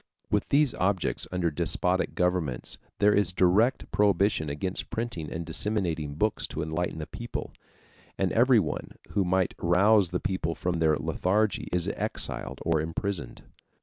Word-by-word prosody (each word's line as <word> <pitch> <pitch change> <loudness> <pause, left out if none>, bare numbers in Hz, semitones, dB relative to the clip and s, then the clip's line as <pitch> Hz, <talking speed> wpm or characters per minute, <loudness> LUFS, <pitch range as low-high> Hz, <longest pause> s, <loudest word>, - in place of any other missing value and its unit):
With - - +1
these 145 -3 +4
objects 95 0 0
under 90 -2 0
despotic 90 +5 +1
governments 90 -8 -1 0.2
there 105 0 +4
is 100 -2 +2
direct 95 +8 +2
prohibition 100 -5 +2
against 90 +6 -3
printing 115 -9 -4
and 85 +1 -4
disseminating 85 -10 -2
books 105 +7 0
to 80 - -4
enlighten 80 +2 -2
the 80 - -4
people, 120 +8 -6 0.7
and 95 -2 +1
everyone 115 - +2 0.2
who 100 - +2
might 95 0 +1
rouse 95 +3 +4
the 90 - -1
people 85 -3 -2
from 90 -1 -2
their 80 -2 +3
lethargy 105 +3 0
is 90 -1 0
exiled 65 - -3
or 80 -2 +2
imprisoned. 85 -3 -4
90 Hz, 145 wpm, -28 LUFS, 80-105 Hz, 0.7 s, these